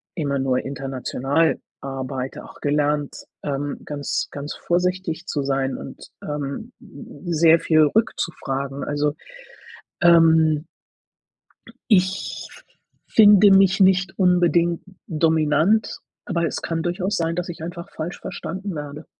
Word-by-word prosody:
immer 140 Hz, -5 st, -1 dB
nur 130 Hz, -1 st, +1 dB
international 135 Hz, +3 st, -1 dB, 0.2 s
arbeite, 135 Hz, -1 st, -5 dB
auch -, -, -14 dB
gelernt, 145 Hz, 0 st, -1 dB, 0.2 s
ähm, 145 Hz, 0 st, -3 dB
ganz, 145 Hz, -1 st, -3 dB
ganz 145 Hz, +1 st, -6 dB
vorsichtig 180 Hz, -1 st, -1 dB
zu 145 Hz, -6 st, -2 dB
sein 135 Hz, -1 st, -1 dB
und, -, -, -10 dB
ähm, 150 Hz, -, -5 dB
m 230 Hz, -, -13 dB
m 175 Hz, -, -2 dB
sehr 165 Hz, +1 st, +6 dB
viel 155 Hz, -1 st, +4 dB
rückzufragen, 140 Hz, -, -1 dB
also, 145 Hz, 0 st, -1 dB, 0.9 s
ähm 160 Hz, -2 st, +5 dB, 1.3 s
ich 190 Hz, -1 st, +1 dB
f -, -, -17 dB, 0.4 s
finde 205 Hz, -2 st, +7 dB
mich 190 Hz, -1 st, +5 dB
nicht 190 Hz, 0 st, +3 dB
unbedingt 175 Hz, -2 st, +3 dB, 0.2 s
dominant, 160 Hz, +5 st, +2 dB, 0.3 s
aber 170 Hz, -3 st, -1 dB
es -, -, -3 dB
kann 165 Hz, -1 st, -2 dB
durchaus 180 Hz, +3 st, -1 dB
sein, 165 Hz, 0 st, -1 dB
dass 180 Hz, +1 st, -3 dB
ich 165 Hz, -2 st, -7 dB
einfach 170 Hz, +1 st, -7 dB
falsch 170 Hz, +3 st, -6 dB
verstanden 185 Hz, +1 st, -6 dB
werde. 150 Hz, +1 st, -7 dB
160 Hz, 120 wpm, -22 LUFS, 145-180 Hz, 1.3 s, finde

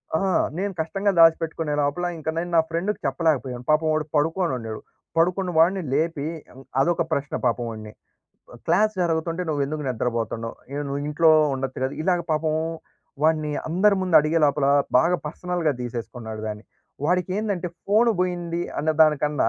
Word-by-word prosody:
ఆహా! 190 Hz, +3 st, +1 dB, 0.2 s
నేను 200 Hz, +2 st, -2 dB
కష్టంగా 195 Hz, +5 st, 0 dB
దాసిపెట్టుకునే 165 Hz, -1 st, +3 dB
లోపల, 145 Hz, +5 st, -1 dB
ఇంక 160 Hz, 0 st, -4 dB
నేను 175 Hz, +1 st, -2 dB
నా -, -, +7 dB
ఫ్రెండ్‌కి 175 Hz, +6 st, -2 dB
చెప్పలేకపోయాం, 135 Hz, -3 st, 0 dB
పాపం 155 Hz, +1 st, +3 dB
వాడు 155 Hz, 0 st, 0 dB
పడుకునుండెడు. 145 Hz, -8 st, -1 dB, 0.4 s
పడుకున్న‌వాడిని 180 Hz, +1 st, +2 dB
లేపి 155 Hz, 0 st, 0 dB, 0.2 s
యవ్ 130 Hz, -, -14 dB, 0.2 s
అదొక 170 Hz, +4 st, +2 dB
ప్రశ్న 140 Hz, -2 st, -1 dB
పాపం 120 Hz, 0 st, +1 dB
వాడిని, 110 Hz, -1 st, -8 dB, 0.6 s
ఆహ్, -, -, -12 dB
"క్లాస్ 215 Hz, 0 st, +3 dB
జరుగుతుంటే, 165 Hz, +1 st, -1 dB
నువ్వేందుకు 150 Hz, +1 st, -2 dB
నిద్రపోతుండవు? 115 Hz, -1 st, -2 dB
అయిన 140 Hz, +2 st, -4 dB
నువ్వింట్లో 150 Hz, +3 st, +2 dB, 0.2 s
ఉండొచ్చు 130 Hz, -1 st, -4 dB
గదా!" 130 Hz, -, -2 dB
ఇలాగ 180 Hz, +1 st, +2 dB
పాపం 155 Hz, 0 st, 0 dB, 0.7 s
వాడ్ని 155 Hz, -1 st, +2 dB, 0.2 s
అందరి 195 Hz, +5 st, +3 dB
ముందు 180 Hz, -3 st, +3 dB
అడిగేలోపల, 150 Hz, -2 st, +2 dB, 0.3 s
బాగా 170 Hz, +7 st, +3 dB
పర్సనల్‌గా 170 Hz, 0 st, -1 dB
తీసేసుకున్నాడు 115 Hz, -2 st, -6 dB
దాన్ని. 105 Hz, 0 st, -6 dB, 0.4 s
వాడికేందంటే 185 Hz, +2 st, -1 dB, 0.2 s
ఫోను 220 Hz, +4 st, +4 dB
బోయింది 175 Hz, -2 st, -1 dB, 0.2 s
అన్న 155 Hz, +2 st, +1 dB
దానికన్నా, 150 Hz, -1 st, +2 dB
160 Hz, 135 wpm, -24 LUFS, 140-175 Hz, 0.7 s, నా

